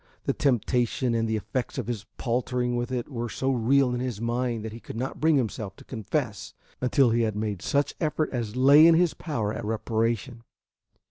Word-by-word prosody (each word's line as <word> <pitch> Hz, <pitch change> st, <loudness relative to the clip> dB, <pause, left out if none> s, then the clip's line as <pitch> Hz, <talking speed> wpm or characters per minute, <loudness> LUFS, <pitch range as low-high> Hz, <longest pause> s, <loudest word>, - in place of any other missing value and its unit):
The -, -, 0 dB
temptation 125 Hz, -1 st, +1 dB
and 115 Hz, -1 st, 0 dB
the 110 Hz, -, +1 dB
effects 110 Hz, +4 st, -3 dB
of -, -, -2 dB
his 115 Hz, -4 st, -4 dB
paltering 125 Hz, 0 st, -1 dB
with 120 Hz, +1 st, -2 dB
it 125 Hz, -2 st, -2 dB
were 120 Hz, -4 st, -4 dB
so 135 Hz, +3 st, -1 dB
real 130 Hz, +1 st, +3 dB
in 125 Hz, -, -2 dB
his 125 Hz, -5 st, -3 dB
mind 120 Hz, -1 st, -1 dB
that 110 Hz, -, -5 dB
he 115 Hz, -, -9 dB
could -, -, -9 dB
not 130 Hz, +3 st, -4 dB
bring 160 Hz, 0 st, +4 dB
himself 110 Hz, -5 st, -3 dB
to -, -, -15 dB
confess 115 Hz, -2 st, -4 dB, 0.3 s
until 125 Hz, 0 st, +3 dB
he 115 Hz, +1 st, +2 dB
had 110 Hz, -2 st, 0 dB
made 105 Hz, -3 st, -3 dB
such 140 Hz, 0 st, 0 dB
effort 155 Hz, -1 st, 0 dB
as 115 Hz, -4 st, -3 dB
lay 140 Hz, +5 st, +7 dB
in 165 Hz, -, +6 dB
his 175 Hz, -1 st, +3 dB
power 110 Hz, -10 st, -3 dB
at 115 Hz, -, -5 dB
reparation. 115 Hz, +2 st, -1 dB
120 Hz, 200 wpm, -26 LUFS, 110-130 Hz, 0.3 s, lay